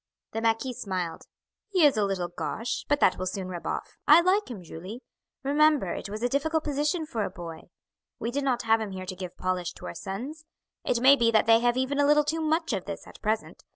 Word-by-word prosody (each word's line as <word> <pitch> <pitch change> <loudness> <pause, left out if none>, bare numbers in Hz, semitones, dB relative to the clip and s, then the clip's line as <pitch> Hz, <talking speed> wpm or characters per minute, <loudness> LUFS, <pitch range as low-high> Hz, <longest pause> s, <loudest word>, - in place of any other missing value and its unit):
The 225 - -3
marquis 230 +3 +1
smiled. 185 -7 -4 0.4
"He 370 -6 +4
is 285 - +5
a 215 - +2
little 190 -3 -1
gauche, 225 +6 -3
but 290 0 +3
that 185 - +4
will 185 - -2
soon 185 0 -4
rub 175 -2 -6
off. - - -4
I 310 +3 +9
like 380 +2 +2
him, 210 -7 -7
Julie. 185 +9 -9 0.4
Remember 290 - +3
it - - -6
was 215 +3 -5
a - - +4
difficult 310 +5 0
position 300 +3 0
for 230 -8 -2
a 195 - -2
boy. 170 -4 -9 0.5
We 230 - -3
did 285 +3 -1
not 250 -3 0
have 225 0 +3
him 205 -3 -4
here 185 0 -6
to 185 0 -5
give 180 -1 -7
polish 185 -2 -2
to - - -11
our 85 - -5
sons. 255 - -6 0.4
It 235 - 0
may 270 +2 +8
be 235 -4 +3
that 220 -2 +4
they 225 0 +6
have 240 +1 +2
even 260 +2 0
a 285 - +4
little 300 0 +5
too 320 +2 -1
much 320 -2 0
of 190 -3 -2
this 200 0 -6
at - - -14
present. 215 +1 -2
230 Hz, 235 wpm, -27 LUFS, 190-290 Hz, 0.5 s, I